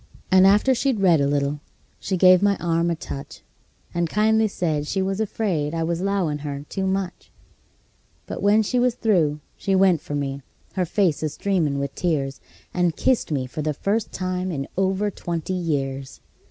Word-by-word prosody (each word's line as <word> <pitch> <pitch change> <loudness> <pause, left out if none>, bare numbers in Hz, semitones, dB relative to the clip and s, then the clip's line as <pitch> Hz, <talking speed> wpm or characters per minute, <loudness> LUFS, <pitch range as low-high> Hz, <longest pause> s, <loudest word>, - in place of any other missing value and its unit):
And 185 0 +7
after 210 +7 +4
she'd 255 -2 0
read 175 -6 +4
a 140 - +2
little 145 0 0 0.4
she 190 - -2
give 185 0 +6
my 200 0 +3
arm 170 -1 0
a 170 - 0
touch, 140 -3 -8 0.5
And 170 -1 0
kindly 220 +2 +3
said 155 -7 -2
she 195 - -1
was 195 +2 -1
afraid 175 -8 -1
I 165 - 0
was 170 +1 -1
'lowin' 190 -7 0
her 145 -1 -5
too 190 -1 -2
much; 190 -1 -3 1.0
But - - -6
when 210 +2 +4
she 250 +4 0
was 245 -1 +2
through 165 -11 +1 0.2
she 195 - 0
went 185 -4 +4
for 145 - -5
me, 140 -1 -3 0.3
her 185 -2 0
face 175 -3 +1
a 155 - 0
streamin' 160 -3 0
with 140 -1 -3
tears, 140 -6 -1 0.3
And 175 -2 +1
kissed 255 -9 +1
me 135 -4 0
for 130 +4 -5
the 150 -1 -1
first 205 +8 -1
time 185 0 -2
in 140 -3 -3
over 195 +2 0
twenty 170 0 -4
years! 140 -6 -3
175 Hz, 180 wpm, -23 LUFS, 150-195 Hz, 1.0 s, And